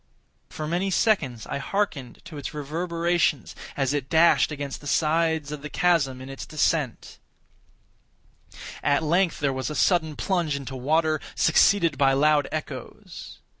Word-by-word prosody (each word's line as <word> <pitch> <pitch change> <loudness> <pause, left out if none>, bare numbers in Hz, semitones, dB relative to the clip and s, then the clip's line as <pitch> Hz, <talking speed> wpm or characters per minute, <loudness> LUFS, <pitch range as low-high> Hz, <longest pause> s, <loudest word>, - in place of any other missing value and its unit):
For 155 - -6
many 175 +4 -1
seconds 160 - +1
I - - -4
hearkened 140 - -3
to 160 -5 -8
its 145 - -7
reverberations 170 0 -1 0.2
as 135 -1 0
it 140 -3 -3
dashed 165 0 +4
against 145 -2 -5
the 145 - -9
sides 160 -1 +1
of 150 -1 -6
the 150 - -7
chasm 145 -7 +1
in 130 - -9
its 135 0 -7
descent; 150 -4 -1 1.6
at 145 +2 +1
length 170 +3 +1
there 140 -2 0
was 130 +2 -3
a 150 - -5
sullen 160 -4 +2
plunge 170 -6 -1
into 135 -1 -6
water, 155 +4 +1 0.2
succeeded 165 -1 +3
by 135 -1 +4
loud 150 +1 +3
echoes. 150 -5 -8
150 Hz, 145 wpm, -25 LUFS, 140-170 Hz, 1.6 s, dashed